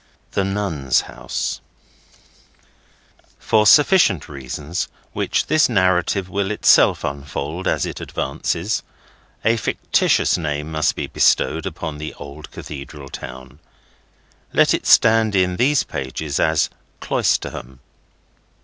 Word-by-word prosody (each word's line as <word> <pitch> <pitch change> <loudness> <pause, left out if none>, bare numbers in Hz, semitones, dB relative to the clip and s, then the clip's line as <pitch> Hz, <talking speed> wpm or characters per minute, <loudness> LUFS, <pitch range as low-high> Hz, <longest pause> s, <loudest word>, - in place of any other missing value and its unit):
THE 100 - 0
NUNS' 95 -10 0
HOUSE - - -5 1.8
For 110 -2 +2
sufficient 150 - +5
reasons, 70 +5 -5 0.3
which - - 0
this 155 -3 +3
narrative 95 -2 +1
will 95 +1 -2
itself 105 - +4
unfold 75 +4 -4
as - - +1
it - - -6
advances, 85 +6 -2 0.6
a 115 +1 +3
fictitious 100 - +1
name 75 -1 -3
must 75 -1 +1
be - - -3
bestowed - - +2
upon 75 -1 -6
the 75 - -6
old 70 +2 -10
Cathedral 70 -1 -9
town. 65 +3 -9 0.9
Let - - +4
it - - -2
stand 110 -2 +5
in 90 -1 +1
these 140 +3 +3
pages 70 +1 -4
as 80 -1 +2 0.3
Cloisterham. 65 +1 -2
80 Hz, 110 wpm, -20 LUFS, 70-100 Hz, 1.8 s, sufficient